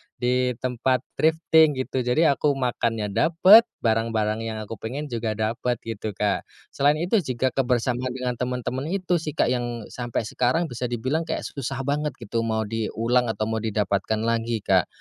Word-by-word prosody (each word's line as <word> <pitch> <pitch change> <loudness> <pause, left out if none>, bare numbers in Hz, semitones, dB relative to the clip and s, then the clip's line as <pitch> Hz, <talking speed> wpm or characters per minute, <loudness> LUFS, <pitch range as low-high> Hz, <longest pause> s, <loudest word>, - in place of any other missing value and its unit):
di 125 0 0
tempat 130 0 0 0.2
thrifting 160 -1 +4
gitu, 130 0 -2
jadi 125 +6 +3
aku 140 +1 +1
makannya 115 -5 -1
dapet, 185 - +6 0.2
barang-barang 110 -1 +1
yang 110 - -4
aku 110 +1 -8
pengen 135 +5 -5
juga 115 -2 -2
dapet 115 +3 -1
gitu, 110 -2 -5
Kak. 105 +1 -1 0.2
Selain 145 +2 +3
itu 175 +7 +1
jika 130 -5 -1
kebersamaan 125 -1 0
dengan 125 -2 -3
temen-temen 125 +2 -3
itu 180 -1 0
sih, 155 -1 -5
Kak, 125 - +2
yang 120 -2 -2
sampai 120 -2 -3
sekarang 125 +8 0
bisa 120 +1 -3
dibilang 130 +8 -2
kayak - - -2
susah 135 0 -4
banget 150 +2 -1
gitu, 115 -1 -4
mau 110 -1 0
diulang 115 +3 0
atau 110 -1 -2
mau 110 +1 -1
didapatkan 105 0 -1
lagi, 115 -1 -1
Kak. 95 -3 +3
125 Hz, 165 wpm, -24 LUFS, 115-140 Hz, 0.2 s, dapet